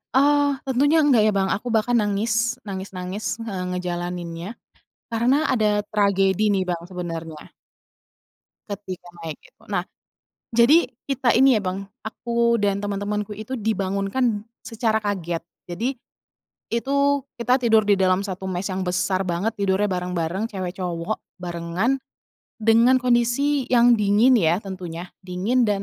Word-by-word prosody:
Oh, 285 +1 +4
tentunya 275 +4 +2
enggak, 265 -6 +5
ya, - - +3
Bang, 195 -1 +1
aku 215 - -2
bahkan 225 +3 +2
nangis 225 +3 0
nangis-nangis, 190 +1 -5 0.2
nge 225 -3 -5 0.2
ngejalaninnya, 175 -1 -4 0.6
karena 235 +4 +2 0.2
ada 220 -4 +2 0.2
tragedi, 200 0 +2
nih, 195 -2 +1
Bang, 175 -2 -2
sebenarnya 165 -3 -6 1.1
ketika 200 -4 -7 0.2
naik 160 -3 -5
itu. - - -23
Nah, 180 -3 0 0.7
jadi 240 +9 +5 0.2
kita 265 -4 +2
ini 265 +1 +6
ya, - - -2
Bang, 190 +1 -3 0.2
aku 235 +1 0
dan 200 -2 0
temen-temenku 205 +1 -2
itu 220 +4 -6
dibangunkan 205 0 0 0.2
secara 225 -1 0
kaget, 180 -6 -3 0.3
jadi, 230 +10 -2 0.8
itu 280 +3 +1 0.2
kita 250 +2 +3
tidur 225 -1 +5
di 205 - +5
dalam 185 -1 +2
satu 190 -2 -5
mess 185 0 -3
yang 190 -1 -2
besar 185 +1 0
banget, 190 +6 -1
tidurnya 200 0 +1
bareng-bareng, 180 +2 -2
cewek-cowok 180 0 -3 0.2
barengan, 175 +8 -1 0.6
dengan 230 +3 +5
kondisi 250 +3 +1
yang 240 -1 +6
dingin, 210 +5 +4
ya, 170 -2 +3
tentunya, 180 -3 -7
dingin 190 +7 0
dan, 205 -2 0
205 Hz, 130 wpm, -23 LUFS, 185-235 Hz, 1.1 s, ini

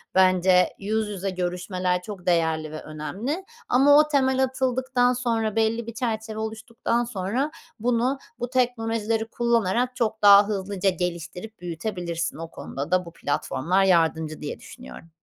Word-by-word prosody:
bence, 185 -1 +5
yüz 215 +2 -1
yüze 195 -1 -3
görüşmeler 180 0 -2
çok 190 -1 -9
değerli 160 -3 +1
ve 155 - -6
önemli 205 - -4 0.3
ama 280 +4 +6
o 300 0 +5
temel 265 -2 +2
atıldıktan 260 -1 +1
sonra, 230 -4 -1
belli 225 +1 +1
bir 230 - -5
çerçeve 220 -2 -3
oluştuktan 225 +2 -2
sonra 240 +6 -2 0.3
bunu 245 +4 +1 0.2
bu 245 0 -3
teknolojileri 225 -3 0
kullanarak 235 +1 +1
çok 220 -2 -1
daha 200 0 +8
hızlıca 195 -1 -1
geliştirip 180 +4 -5
büyütebilirsin. 175 -1 -4
O 165 0 -6
konuda 140 +4 -6
da 185 0 +2
bu 170 - -11
platformlar 170 +5 0
yardımcı 160 -4 +2
diye 150 - -5
düşünüyorum. 65 - -12
210 Hz, 140 wpm, -25 LUFS, 180-235 Hz, 0.3 s, daha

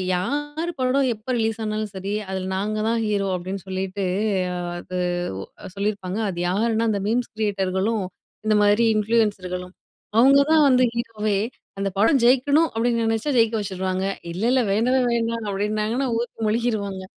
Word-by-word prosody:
"யாரு 295 - -2
படம் 260 +1 +2
எப்ப 215 +4 -6
ரிலீஸ் 225 0 -1
ஆனாலும் 215 -1 -2
சரி. 195 +2 -4 0.2
அதுல 190 -1 -3
நாங்க 210 +3 -1
தான் 230 0 +1
ஹீரோ" 205 -2 0
அப்டின்னு 185 +2 -5
சொல்லிட்டு. 190 +1 -3 0.5
அ - - -4 0.2
அது 180 +1 -6 0.4
ஒ - - -5 0.3
சொல்லியிருப்பாங்க. 200 0 -2
அது 175 -2 -5
யாருன்னா 225 +3 +1
அந்த 200 -2 -1
மீம்ஸ் 240 +3 0
கிரியேட்டர்களும், 200 0 0 0.4
இந்த 215 -1 +4
மாதிரி 205 +3 +4
இன்ஃப்ளூயன்ஸர்களும் 200 -5 0 0.5
அவுங்க 275 +3 +7
தான் 315 -1 +6
வந்து 255 0 +4
ஹீரோவே 215 -3 -1 0.4
"அந்த 195 0 0
படம் 250 +4 +4
ஜெயிக்கணும்" 280 +6 +4
அப்டின்னு 230 0 +1
நெனச்சா, 225 +6 0
ஜெயிக்க 225 0 +3
வச்சுருவாங்க. 190 -1 -2 0.3
"இல்ல, 190 +5 -4
இல்ல 260 -1 +3
வேணவே, 250 +5 +2
வேண்டாம்" 230 -1 -1
அப்டின்னாங்கன்னா 215 +6 -1
ஊத்தி 240 -1 -5
மொழிகிருவாங்க. 210 -4 -1
215 Hz, 145 wpm, -23 LUFS, 195-235 Hz, 0.5 s, அவுங்க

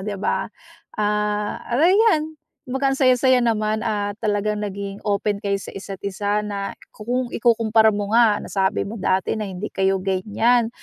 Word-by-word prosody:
'di 205 +1 -4
ba? 195 - -1 0.5
Ah, 210 0 -1
ayan, 320 - +3 0.3
kumbaga, 270 +1 0
ang 270 - -3
saya 255 -1 +5
saya 255 0 +4
naman 215 -2 0
at 205 -1 -2
talagang 210 0 0
naging 200 0 -5
open 205 0 0
kayo 200 -1 0
sa - - -9
isa't 195 -1 -7
isa 205 +2 -1
na 200 -1 -4 0.2
kung 245 +3 -2
ikukumpara 225 -1 +3
mo 205 +1 -3
nga 225 -3 +5
nasabi 195 +1 -1
mo 215 +1 -7
dati 185 +2 +1
na 215 -2 -3
hindi 190 +2 -5
kayo 195 0 +1
ganyan. 215 +5 +1
210 Hz, 160 wpm, -22 LUFS, 200-235 Hz, 0.5 s, saya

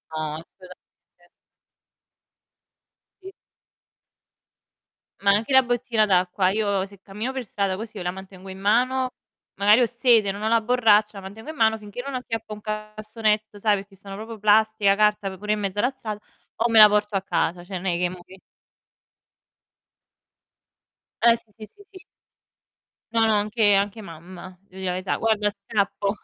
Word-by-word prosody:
No, 155 -1 -3
assolutamente. 180 +1 -16 2.0
Sì. 385 +1 -10 1.9
Ma 200 0 +4
anche 220 +6 0
la 265 0 +6
bottina 240 -2 0
d'acqua, 185 -1 +2
io 200 -2 0
se 200 -1 -16
cammino 210 +6 -5
per 265 -2 -4
strada 200 -2 -2
così 220 +2 -8
io 180 - -5
la 180 - -1
mantengo 190 0 -11
in 190 0 -9
mano, 255 +5 +1 0.5
magari 210 +5 +5
ho 240 - +3
sete, 235 -4 +3
non 205 +2 -7
ho - - 0
la 230 0 +3
borraccia, 215 -3 +3
la 195 - -7
mantengo 215 +8 -10
in 315 - -6
mano 220 -3 +2
finché 210 +3 -8
non 280 - -5
acchiappo 225 -4 -5
un 210 - -10
cassonetto, 215 0 -3
sai, 205 0 +2
perché 195 0 -11
sono 195 +1 -11
proprio 220 +2 -8
plastica, 215 -1 +3
carta, 210 -2 +1
pure 210 +3 -2
in 215 - -2
mezzo 200 0 -3
alla 245 - +2
strada, 220 -6 -7 0.4
o 235 +1 +1
me 225 - +3
la 215 -1 +11
porto 210 0 0
a 190 - 0
casa. 175 -2 -1
Cioè 190 +2 -8
non 190 +2 -5
è 175 - 0
che 180 0 0
mò 180 -1 -10
che 190 +2 -16 2.9
Eh, 235 0 +6
sì, 230 -2 -14
sì, 215 - -9
sì, 405 - -20
sì. 385 - -14 1.1
No, 225 -1 +3
no, 220 - +3
anche 210 0 +2
anche 200 +2 0
mamma, 180 +1 -11
devo 190 -1 -15
di - - -7
la 180 - 0
verità. 185 +1 -2
Guarda, 215 -2 +1
scappo, 200 0 -2
210 Hz, 170 wpm, -23 LUFS, 195-225 Hz, 2.9 s, la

